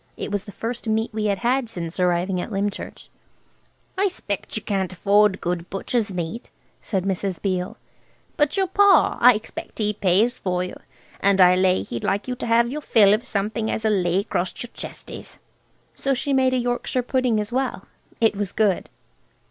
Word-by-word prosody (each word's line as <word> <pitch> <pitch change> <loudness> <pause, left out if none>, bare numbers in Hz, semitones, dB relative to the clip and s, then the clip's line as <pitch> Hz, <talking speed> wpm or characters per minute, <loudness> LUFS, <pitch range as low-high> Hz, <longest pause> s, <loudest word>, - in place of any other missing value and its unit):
It - - -5
was 205 -1 -2
the 205 - -9
first 235 +3 -5
meat 220 +1 0
we 215 0 -2
had 200 -2 +1
had 245 +3 0
since 170 -3 -6
arriving 180 +1 +1
at 225 - -6
Lymchurch. 200 0 -4 0.9
"I 400 - +4
'spect 205 - -5
she - - -2
can't 195 -3 -2
afford 200 +2 +3
good 175 0 -3
butcher's 205 +2 -2
meat," 180 +6 -5 0.3
said 190 -4 -2
Mrs. 190 -1 -2
Beale; 185 -2 -2 0.6
"but 295 +5 +1
your 385 - +3
pa, 390 -2 +4
I 245 -1 +8
expect 215 - -7
he 210 -1 0
pays 205 +5 +2
for 180 -1 -1
you, 180 - -6 0.4
and 200 0 +3
I 180 0 +7
lay 185 0 +2
he'd 120 - -6
like 205 +4 -1
you 255 - -1
to - - -4
have 235 +1 +3
your 300 +2 -4
fill 210 -7 +5
of 230 +5 -1
something 215 +2 -2
as'll 220 0 0
lay 180 -1 +1
acrost 190 -2 -3
your 240 - -10
chesties." - - -9 0.6
So 275 -1 -1
she 280 +2 -1
made 260 -1 +3
a - - +2
Yorkshire 245 +1 -1
pudding 250 -3 +1
as 210 +1 -3
well. 250 -6 -2 0.3
It 225 -2 +3
was 200 -2 -3
good. 205 -4 +1
210 Hz, 185 wpm, -23 LUFS, 190-240 Hz, 0.9 s, I